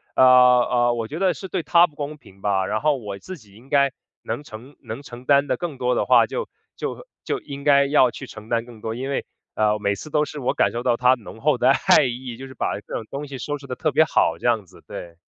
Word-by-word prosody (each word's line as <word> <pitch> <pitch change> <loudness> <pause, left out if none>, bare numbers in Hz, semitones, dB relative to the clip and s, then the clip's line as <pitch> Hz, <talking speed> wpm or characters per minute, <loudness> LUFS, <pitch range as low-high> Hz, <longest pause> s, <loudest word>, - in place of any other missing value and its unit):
呃， - - +5
呃， 125 -1 +5
我 115 -2 -3
觉 155 +8 -6
得 190 -2 +2
是 190 - -8
对 185 -2 -3
她 175 +1 +5
不 150 - -23
公 150 +1 -5
平 95 -8 -19
吧， 95 -2 +1
然 110 +3 -2
后 150 -2 +2
我 105 -5 -7
自 185 - -9
己 105 -6 -20
应 125 +5 -18
该 140 -2 +3 0.3
能 145 - -4
承 125 +4 -12
能 115 +5 -7
承 125 -3 -11
担 140 0 +4
得 - - +1
更 165 -6 -5
多 125 -1 0
的 - - 0
话， - - +5
就 - - -4 0.3
就 - - -5 0.2
就 - - -2
应 140 -1 -9
该 140 -1 +5
要 140 -3 +4
去 - - -8
承 105 +1 -12
担 115 -1 0
更 115 -3 -14
多， 110 0 -4
因 130 +3 -4
为， 140 - -2 0.3
呃， 105 0 +1
每 100 -1 0
次 155 - -9
都 150 0 +2
是 150 - -8
我 125 - 0
感 - - +2
受 120 - -4
到 120 - +2
她 125 +1 +5
浓 115 - -12
厚 - - +2
的 - - +3
爱 - - +4
意， 125 -1 -5
就 135 +1 -8
是 130 - -12
把 100 - -2
各 - - -5
种 110 - -4
东 145 +1 -5
西 135 - -7
收 145 +3 -4
拾 140 - -12
得 125 - -4
特 155 +2 -1
别 160 - +5
好， 85 - +1
这 - - -2
样 110 -4 +1
子， - - -18
对。 85 -1 -8
130 Hz, 290 characters per minute, -23 LUFS, 115-145 Hz, 0.3 s, 呃